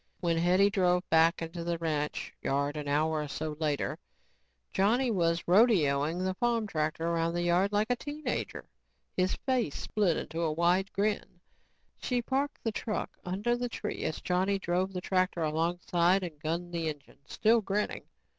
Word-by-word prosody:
When 170 -2 +1
Hetty 185 +4 +4
drove 180 -2 +2
back 165 +1 +4
into 165 +1 -5
the 170 0 -1
ranch 155 -3 -2
yard 140 +2 0
an 150 -1 -5
hour 155 +2 +1
or 150 - -4
so 155 +1 -4
later, 150 -3 -1 0.7
Johnny 235 +6 +2
was 170 -4 +1
rodeoing 175 - +3
the 185 - 0
farm 235 +1 0
tractor 155 -3 -2
around 170 0 0
the 175 - 0
yard 180 +3 +2
like 210 +3 +1
a - - +3
teen 295 +4 -7
ager, - - -3 0.5
his 185 0 +1
face 255 - +1
split 190 -7 -1
in 165 - -2
a 165 -2 +1
wide 175 +4 +2
grin. 205 -3 -1 0.6
She 250 -1 0
parked 275 +4 -2
the 225 - 0
truck 215 0 -3
under 205 +7 0
the 245 0 -3
tree 210 -2 -4
as 155 - -3
Johnny 185 +2 +1
drove 185 0 -1
the 180 -1 -4
tractor 185 -2 0
alongside 175 +3 +1
and 160 -4 -6
gunned 170 +3 -3
the 165 -2 -1
engine, 145 -2 -10
still 225 +1 +3
grinning. 205 +1 -2
175 Hz, 170 wpm, -30 LUFS, 165-205 Hz, 0.7 s, Hetty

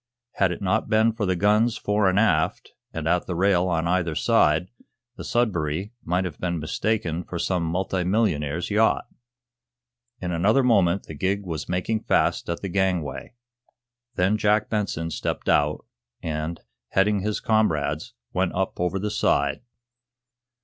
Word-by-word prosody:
Had 95 -2 +1
it 90 - -5
not 95 +2 0
been 110 +1 +4
for 110 -3 -2
the 95 - +1
guns 105 +5 +2
fore 105 -1 +1
and 95 - 0
aft, 85 -8 +1 0.2
and 80 -1 -4
at 90 +1 +1
the 90 - -3
rail 95 0 +3
on 85 -2 0
either 85 -2 0
side, 75 +7 +2 0.4
the - - -8
"Sudbury" 95 -4 -1
might 90 +2 0
have 90 - -6
been 85 -1 -1
mistaken 85 +1 -1
for 85 - -6
some 90 +1 0
multi 90 +2 -1
millionaire's 90 -4 0
yacht. 110 +2 +2 1.1
In 90 -1 -3
another 105 +10 +3
moment 100 -7 +3
the - - -9
gig 95 +6 -1
was 80 -4 -5
making 90 +5 0
fast - - +1
at 85 - -3
the - - -1
gangway. 95 0 -1 0.8
Then 100 +4 +2
Jack 105 0 +2
Benson 90 -6 -2
stepped - - -3
out, 75 +1 +2 0.4
and, 80 +1 -3 0.3
heading 100 +1 +2
his 105 +2 -2
comrades, 80 - 0 0.2
went 90 0 0
up 95 +1 -2
over 90 +2 0
the 105 +2 -2
side. 70 -4 +1
90 Hz, 155 wpm, -24 LUFS, 85-105 Hz, 1.1 s, been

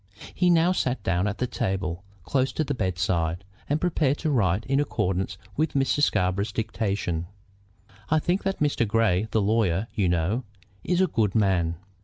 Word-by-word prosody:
He 180 -1 +2
now 170 +1 +4
sat 130 - -1
down 90 +2 +1
at 105 0 -3
the 125 - 0
table 95 -6 -2 0.2
close 130 +7 0
to 155 - 0
the 145 -1 -2
bedside, 90 - -1 0.3
and 145 +2 +1
prepared 155 -5 +1
to 155 - -1
write 100 -6 +1
in 135 +1 +1
accordance 95 -9 -1 0.2
with 155 +1 0
Mr. 135 +1 +1
Scarborough's 100 -4 +1
dictation. 100 -6 -2 0.8
"I 155 - +3
think 175 +5 0
that 195 0 -1 0.3
Grey, 110 -2 +2
the 110 -1 +1
lawyer, 100 -3 +1
you 95 -4 +1
know, 90 +9 0 0.4
is 180 +1 +1
a 190 - +4
good 110 - 0
man." 95 -6 +2
105 Hz, 165 wpm, -26 LUFS, 95-140 Hz, 0.8 s, now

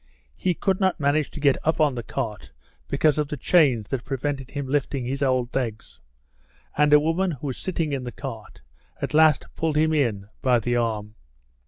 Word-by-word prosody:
He 180 - 0
could 190 +1 0
not 190 -3 +1
manage 145 +1 +1
to - - -9
get 140 -2 +3
up 160 +1 +1
on 150 -3 +3
the 120 - -4
cart 115 -2 -5 0.4
because 155 -1 +2
of 150 - 0
the 150 - -5
chains 130 - +3
that 130 -3 -2
prevented 135 0 -3
his 140 -2 -4
lifting 135 -1 -1
his 135 +3 -3
old 130 -3 +1
legs, 115 -5 -4 0.8
and 150 0 +3
a 150 - +8
woman 165 +5 +1
who 145 0 -8
was 130 -3 -3
sitting 165 -5 -2
in 135 -2 -2
the 120 - -5
cart - - -9 0.4
at - - -4
last 155 -2 +5
pulled 160 -2 -1
him 160 +1 +3
in 115 -10 0
by 125 -2 +3
the 120 +2 -1
arm. 110 -3 -1
140 Hz, 195 wpm, -24 LUFS, 125-155 Hz, 0.8 s, a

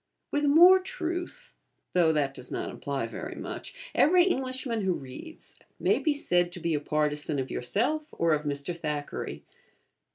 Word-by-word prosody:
With 290 0 +1
more 345 +6 +8
truth 350 -1 -5 0.4
(though 170 -3 +4
that 145 -3 0
does 125 - -10
not - - -3
imply 140 -4 -3
very 115 - -6
much) - - -7
every 355 +3 +5
Englishman 260 - -1
who 190 -2 +1
reads 135 - -10 0.2
may - - +2
be 305 -3 +1
said 175 -10 +1
to 175 - -6
be 170 -1 -1
a 150 - +1
partisan 150 0 -1
of 130 -1 -3
yourself 255 - -1
or 165 -1 +1
of 150 - +1
Mr. 145 +3 -2
Thackeray. 150 -3 -4
175 Hz, 160 wpm, -28 LUFS, -, 0.4 s, more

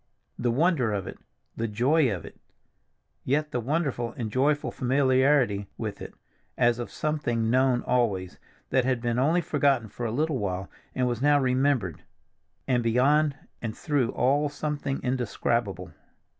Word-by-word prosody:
The 120 - +1
wonder 135 -2 +2
of 100 -3 -2
it, - - -8 0.4
the 115 - -2
joy 125 +6 +2
of 90 -5 -4
it—yet 140 - -6
the 125 - -1
wonderful 130 -3 -1
and 110 -3 -3
joyful 145 +4 +1
familiarity 130 -5 +2
with - - -5
it, - - -8 0.4
as 120 0 +3
of 120 - -4
something 120 -7 -1
known 130 -1 +3
always, 100 -8 0 0.3
that 130 - +3
had 130 -1 +1
been 120 0 -1
only 160 +7 +3
forgotten 140 -8 +1
for 120 +3 -4
a - - -3
little 150 +2 0
while, 95 -2 -3 0.2
and 125 -1 +1
was 120 -1 -2
now 145 0 +4
remembered; 130 - +1 0.7
and 125 -2 +2
beyond 140 +6 +3 0.3
and 110 -2 -4
through 140 -6 0
all 140 +4 +2
something 145 -2 -3
indescribable. 115 -7 -1
125 Hz, 145 wpm, -27 LUFS, 115-145 Hz, 0.7 s, now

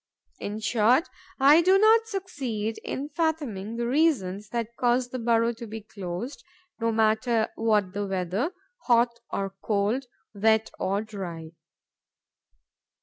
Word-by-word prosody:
In 210 +1 -4
short, 240 - +3 0.3
I 290 +5 +7
do 375 +3 +5
not 445 +2 +5
succeed 265 - -3
in 280 +2 -4
fathoming 285 - -2
the 235 0 -2
reasons 235 - +1
that 235 0 -3
cause 245 +1 +1
the 255 - -5
burrow 230 0 +2
to 230 0 -9
be 220 +1 -7
closed, 205 - -6 0.4
no 230 0 +1
matter 220 +1 +2
what 210 -4 +1
the 205 0 -2
weather, 190 - -1 0.3
hot 235 -1 +3
or 195 -1 -2
cold, 215 +5 0 0.3
wet 220 +1 +2
or 200 +2 0
dry. 175 -7 -7
225 Hz, 130 wpm, -26 LUFS, 205-260 Hz, 0.4 s, I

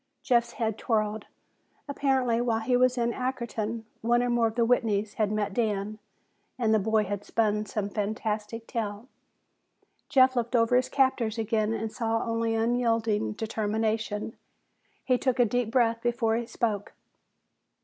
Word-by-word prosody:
Jeff's 235 -1 +2
head 220 -2 -2
whirled. 215 -2 0 0.6
Apparently, 265 -4 +1
while 230 -2 0
he 245 +3 +1
was 255 0 +3
in 235 0 +1
Ackerton, 235 -3 -3 0.2
one 240 +2 +2
or 245 - 0
more 235 -1 +3
of 220 - -5
the 235 -1 +3
Whitneys 220 -4 +1
had 210 -2 +2
met 210 -2 -1
Dan 215 -1 -1 0.6
and 225 -3 +2
the 220 - +4
boy 220 +1 +2
had 205 0 -4
spun 210 -1 0
some 205 -1 -2
fantastic 215 +1 -3
tale. 220 -1 -4 1.0
Jeff 260 -2 +5
looked 240 0 -1
over 230 +1 +3
his 250 0 +2
captors 260 -5 +1
again 220 -1 0
and 225 -1 -3
saw 225 -1 -1
only 230 -1 -1
unyielding 225 - +1
determination. 220 - -2 0.7
He 255 -1 +2
took 260 -2 0
a 245 - +5
deep 245 +1 0
breath 230 -1 +2
before 235 -2 +1
he 235 0 -2
spoke. 220 -4 -2
225 Hz, 150 wpm, -27 LUFS, 215-240 Hz, 1.0 s, Jeff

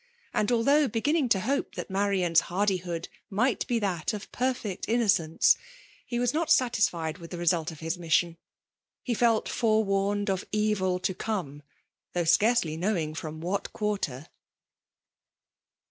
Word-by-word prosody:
Und 215 +2 +1
although 275 +5 +3
heginning 285 +4 +1
to 190 -4 +3
hope 275 +7 -1
that - - -6
Marian's 190 -4 +2
haid8K>od 180 -3 -1 0.2
might 230 +5 +1
he 240 -2 +2
diat 185 -3 -1
of 205 - -9
perfect 245 -6 -2
inoo* 235 +2 +2 0.2
eence, 160 - +4 0.5
he 240 - -3
was 245 +1 +1
not 320 +1 -1
satisfied 200 - +2
with 165 -1 -10
the 175 - -6
result 170 -1 +1
of 160 - -12
his 165 +2 -3
mission. 165 0 +1 0.7
He 245 - -1
felt 230 -1 +2
forewarned 205 -2 +1
of 190 -1 -2
evil 210 -4 +1
to 185 +1 -1
come^ 180 -9 -4 0.5
though 175 - 0
scarcely 170 0 +3
knowing 170 -4 -1
firom 155 0 -6
what 185 +4 -3
quarter. 195 - -2
195 Hz, 145 wpm, -28 LUFS, 170-230 Hz, 0.7 s, eence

